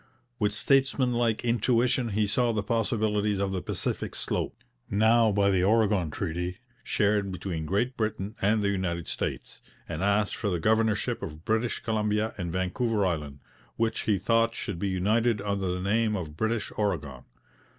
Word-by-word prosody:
With 105 Hz, -2 st, +2 dB
statesmanlike 120 Hz, 0 st, +2 dB
intuition 120 Hz, +1 st, +2 dB
he 105 Hz, +1 st, +1 dB
saw 120 Hz, +4 st, +2 dB
the 105 Hz, -2 st, -1 dB
possibilities 105 Hz, -2 st, 0 dB
of 100 Hz, 0 st, -1 dB
the 95 Hz, -1 st, -2 dB
Pacific -, -, -3 dB
slope, -, -, -3 dB, 0.3 s
now, 110 Hz, +2 st, +4 dB
by 100 Hz, 0 st, +3 dB
the 90 Hz, -2 st, +2 dB
Oregon 105 Hz, -4 st, +3 dB
Treaty, 90 Hz, +4 st, -3 dB, 0.3 s
shared 105 Hz, -2 st, +1 dB
between 85 Hz, -3 st, -4 dB
Great 120 Hz, +8 st, 0 dB
Britain 110 Hz, -1 st, -2 dB
and 105 Hz, +2 st, +2 dB
the 100 Hz, -, +2 dB
United 85 Hz, -4 st, -2 dB
States, -, -, -4 dB, 0.3 s
and 80 Hz, 0 st, -4 dB
asked 100 Hz, +1 st, +2 dB
for 105 Hz, -, -2 dB
the 90 Hz, -3 st, -1 dB
governorship 110 Hz, +4 st, +1 dB
of 80 Hz, +1 st, -7 dB
British 110 Hz, +2 st, 0 dB
Columbia 105 Hz, 0 st, 0 dB
and 85 Hz, -2 st, -3 dB
Vancouver 100 Hz, +4 st, 0 dB
Island, 75 Hz, -6 st, -3 dB, 0.3 s
which 115 Hz, 0 st, 0 dB
he 105 Hz, -, +4 dB
thought 115 Hz, +4 st, +2 dB
should 95 Hz, -5 st, -4 dB
be 100 Hz, -, -1 dB
united 105 Hz, +5 st, +2 dB
under 100 Hz, -1 st, -2 dB
the 90 Hz, -, -2 dB
name 105 Hz, +3 st, +1 dB
of 80 Hz, -6 st, -5 dB
British 110 Hz, +4 st, -1 dB
Oregon. 70 Hz, -11 st, -2 dB
105 Hz, 160 wpm, -28 LUFS, 95-115 Hz, 0.3 s, now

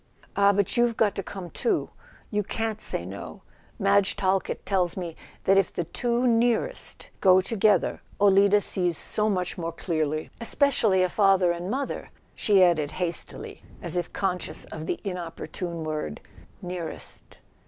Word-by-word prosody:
"Ah, 200 Hz, 0 st, +5 dB
but 200 Hz, +1 st, +1 dB
you've 240 Hz, -1 st, +2 dB
got 210 Hz, -3 st, +3 dB
to -, -, -3 dB
come 180 Hz, -2 st, -8 dB
too. 240 Hz, -, -1 dB, 0.4 s
You 210 Hz, -1 st, +1 dB
can't 220 Hz, +1 st, -3 dB
say 85 Hz, -, -1 dB
no: 95 Hz, +2 st, -8 dB, 0.3 s
Madge 200 Hz, 0 st, +3 dB
Talkett 195 Hz, -1 st, -1 dB
tells 185 Hz, -3 st, +1 dB
me 170 Hz, -3 st, -5 dB, 0.3 s
that 195 Hz, +1 st, +5 dB
if 195 Hz, -, 0 dB
the 175 Hz, -, -2 dB
two 240 Hz, +8 st, -1 dB
nearest 240 Hz, -, 0 dB
go 185 Hz, -1 st, +6 dB
to¬ 190 Hz, +3 st, 0 dB
gether 205 Hz, -3 st, +3 dB, 0.2 s
Olida 200 Hz, +1 st, +5 dB
sees 175 Hz, -3 st, +2 dB
so 215 Hz, 0 st, +1 dB
much 180 Hz, -3 st, -2 dB
more 165 Hz, 0 st, -3 dB
clearly—especially 185 Hz, -, +1 dB
a -, -, +3 dB
father 190 Hz, -2 st, +3 dB
and 175 Hz, +2 st, -4 dB
mother," 270 Hz, +4 st, -3 dB, 0.2 s
she 200 Hz, -3 st, +4 dB
added 160 Hz, -5 st, +3 dB
hastily, 175 Hz, -3 st, -3 dB, 0.2 s
as -, -, -4 dB
if 175 Hz, -1 st, -2 dB
conscious 185 Hz, -3 st, -2 dB
of 155 Hz, 0 st, -8 dB
the -, -, -2 dB
inopportune 165 Hz, -, -4 dB, 0.5 s
"nearest." 175 Hz, -2 st, -6 dB
190 Hz, 145 wpm, -26 LUFS, 175-210 Hz, 0.5 s, go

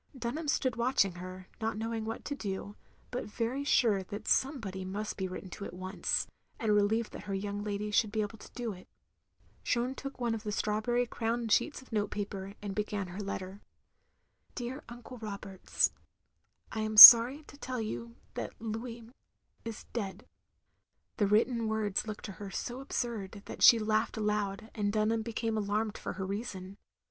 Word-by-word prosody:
Dunham 260 Hz, +6 st, -4 dB
stood 260 Hz, -5 st, 0 dB
watching 235 Hz, -5 st, +2 dB
her; 185 Hz, +1 st, -9 dB
not 220 Hz, -1 st, -2 dB
knowing 225 Hz, 0 st, -3 dB
what 225 Hz, +1 st, -5 dB
to 290 Hz, -, -3 dB
do, 200 Hz, -4 st, -5 dB, 0.4 s
but 250 Hz, -, -3 dB
very 235 Hz, +6 st, -3 dB
sure 225 Hz, -8 st, +3 dB
that 205 Hz, +3 st, -8 dB
somebody 230 Hz, -9 st, 0 dB
must 200 Hz, +3 st, -4 dB
be 190 Hz, -1 st, -3 dB
written 185 Hz, 0 st, -8 dB
to 200 Hz, -, -7 dB
at 180 Hz, -, -8 dB
once, 185 Hz, +1 st, -1 dB, 0.3 s
and 220 Hz, -2 st, +1 dB
relieved 210 Hz, +2 st, +1 dB
that -, -, -9 dB
her 200 Hz, -1 st, -3 dB
young 205 Hz, +1 st, -4 dB
lady 210 Hz, 0 st, -3 dB
should 210 Hz, 0 st, +2 dB
be 215 Hz, 0 st, 0 dB
able 210 Hz, +1 st, -7 dB
to -, -, -13 dB
do 240 Hz, -3 st, -4 dB
it. 185 Hz, -, -14 dB, 0.8 s
Jeanne 245 Hz, +1 st, 0 dB
took 275 Hz, -1 st, -8 dB
one 240 Hz, -2 st, 0 dB
of 225 Hz, -, -4 dB
the 210 Hz, -1 st, -4 dB
strawberry 215 Hz, +4 st, 0 dB
crowned 230 Hz, -1 st, -2 dB
sheets 290 Hz, +1 st, +1 dB
of 260 Hz, -, -22 dB
note 210 Hz, -2 st, 0 dB
paper, 200 Hz, -1 st, -5 dB
and 200 Hz, -1 st, -4 dB
began 205 Hz, -2 st, -3 dB
her 180 Hz, +3 st, -8 dB
letter. 195 Hz, -1 st, -5 dB, 0.9 s
^'Dear 250 Hz, +3 st, -5 dB
Uncle 245 Hz, +1 st, -10 dB
Roberts, 200 Hz, -3 st, -1 dB, 0.8 s
I 220 Hz, -, -4 dB
ant 215 Hz, 0 st, +3 dB
sorry 245 Hz, +7 st, +13 dB
to 285 Hz, -, -15 dB
tell 255 Hz, -3 st, -5 dB
you 230 Hz, +1 st, -5 dB, 0.2 s
that -, -, -6 dB
Louis 230 Hz, +2 st, -5 dB, 0.6 s
is 230 Hz, -2 st, -7 dB
dead 200 Hz, -5 st, -4 dB, 0.3 s
— -, -, -47 dB
" -, -, -50 dB
the 205 Hz, -, +2 dB
written 225 Hz, +2 st, +2 dB
words 215 Hz, -1 st, -1 dB
looked 215 Hz, -1 st, -6 dB
to 200 Hz, -, -6 dB
her 200 Hz, -, -5 dB
so 245 Hz, +5 st, -5 dB
absurd 220 Hz, -7 st, -4 dB
that -, -, -9 dB
she 235 Hz, -, +9 dB
laughed 220 Hz, +1 st, 0 dB
aloud, 210 Hz, 0 st, -2 dB
and 205 Hz, -2 st, -1 dB
Dunham 220 Hz, +1 st, +1 dB
became 225 Hz, 0 st, -3 dB
alarmed 210 Hz, +1 st, -1 dB
for -, -, -5 dB
her 190 Hz, -, -4 dB
reason. 195 Hz, -1 st, -6 dB
215 Hz, 180 wpm, -31 LUFS, 200-235 Hz, 0.9 s, sorry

